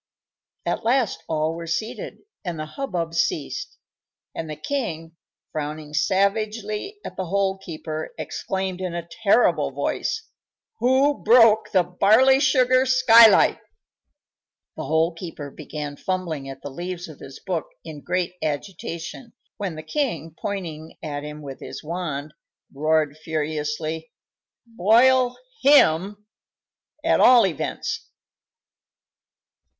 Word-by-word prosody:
At - - -1
last 235 -7 +1
all 155 0 0
were 165 0 -7
seated 220 - -4 0.2
and 175 -3 -4
the 155 - -4
hubbub 170 - -4
ceased, 160 -3 -2 0.6
and 160 - -5
the 155 - -4
king, 165 - -4 0.4
frowning 150 0 -5
savagely 210 - 0
at - - -7
the 185 - -3
Hole 195 +1 0
keeper, 155 -3 -6
exclaimed, 190 -1 -3
in 180 -2 -3
a 170 -1 -5
terrible 200 +7 +2
voice, 450 - -2 0.5
"Who 270 +3 +3
broke 225 -2 +6
the 185 -2 +4
barley 220 +10 +4
sugar 260 -2 +4
skylight?" 235 -4 +7 1.2
The - - -5
Hole 160 +2 +2
keeper 165 -4 -8
began 150 -1 -6
fumbling 170 -7 -3
at 135 0 -9
the 145 - -6
leaves 175 +4 -5
of 155 -3 -12
his 135 - -10
book 175 -5 -3 0.2
in 155 -3 -8
great 180 +1 -1
agitation, 170 - -5 0.2
when 195 -6 -3
the 155 - -7
king, 165 - -2
pointing 165 -6 -5
at 145 -2 -4
him 150 0 -8
with 135 -2 -8
his - - -8
wand, 155 -3 -4 0.4
roared 155 0 +1
furiously: 155 0 -3 0.6
"Boil 240 +4 +4 0.2
him, 205 - +4 0.8
at 330 - +4
all 245 -3 +7
events!" 170 -7 -3
175 Hz, 120 wpm, -23 LUFS, 155-220 Hz, 1.2 s, skylight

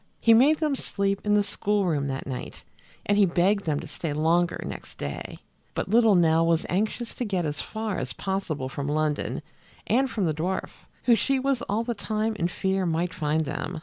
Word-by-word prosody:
He 230 - +6
made 275 +7 +6
them 305 -2 0
sleep 200 -6 -1
in 210 0 +3
the 205 - +4
school 205 0 0
room 145 -5 0
that 135 0 -3
night, 130 -2 -6 0.4
and 205 0 +2
he 200 - +6
begged 190 +4 +2
them 150 -3 0
to - - -8
stay 160 -4 -4
longer 165 +3 +2
next - - -8
day, 70 0 -5 0.4
but - - -2
little 225 -1 +5
Nell 165 -1 +4
was 165 -1 +2
anxious 220 +5 -1
to - - -3
get 190 -6 -1
as 150 -1 -2
far 220 -2 -3
as 130 -1 -4
possible 190 -8 -2
from 140 +1 -4
London 150 0 -1 0.4
and 260 +4 +2
from 210 -6 -1
the 160 - +1
dwarf, 175 +5 -2 0.3
who 245 - +5
she 270 +4 +2
was 265 -1 0
all 215 +3 +1
the 240 0 -2
time 215 0 -2
in 170 - +1
fear 190 +1 -1
might 170 +2 0
find 155 0 0
them. 155 +3 -4
190 Hz, 205 wpm, -26 LUFS, 160-215 Hz, 0.4 s, He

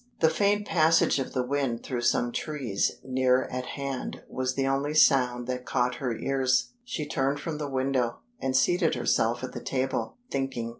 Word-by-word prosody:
The 160 - +4
faint 205 +4 +2
passage 160 -5 +3
of 135 - -4
the 125 - 0
wind 135 -3 -1
through 125 -3 -3
some 120 0 +2
trees 130 -9 -1
near 130 0 +2
at 125 0 -4
hand 140 -2 -4
was 130 0 -2
the 135 - 0
only 140 +3 0
sound 125 -5 +4
that 125 0 -3
caught 125 -1 0
her 120 -4 -1
ears. 130 -2 +1
She 210 -11 -4
turned 140 -1 0
from 155 0 -4
the 145 -2 -3
window, 130 -3 0 0.2
and 130 -1 +1
seated 175 +4 +2
herself 115 +3 +1
at 130 - -4
the - - -7
table, 135 - -2
thinking. 135 -4 -2
135 Hz, 180 wpm, -27 LUFS, 125-145 Hz, 0.2 s, The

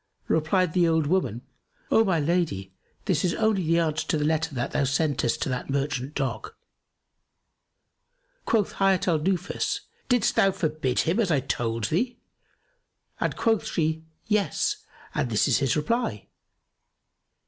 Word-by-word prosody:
Replied 165 +2 +1
the 175 -2 +3
old 160 -2 +2
woman, 145 - 0 0.5
"O 225 - +6
my 185 -6 +1
lady, 145 - -1 0.3
this 180 -7 +1
is 175 -2 +1
only 220 -3 +2
the 165 0 +2
answer 155 -2 0
to - - +1
the 150 - 0
letter 160 -1 0
thou 125 +3 -1
sentest 135 -3 0
to - - -2
that 125 +1 -3
merchant 140 0 -2
dog." 135 -2 -3 1.9
Quoth 220 -3 +2
Hayat 195 -2 +2
al 165 -3 +3
Nufus, 180 +3 -1 0.3
"Didst 245 -4 +2
thou 195 - +5
forbid 155 -8 0
him 175 +7 0
as 210 -5 +2
I 150 -4 +3
told 115 -3 -2
thee?"; 235 - 0 1.0
and - - -1
quoth 225 -2 +1
she, 160 -1 -1 0.2
"Yes, 210 -2 0 0.4
and 125 - -1
this 110 -2 +2
is - - +3
his 135 -2 +1
reply." 150 - -1
160 Hz, 145 wpm, -26 LUFS, 140-185 Hz, 1.9 s, O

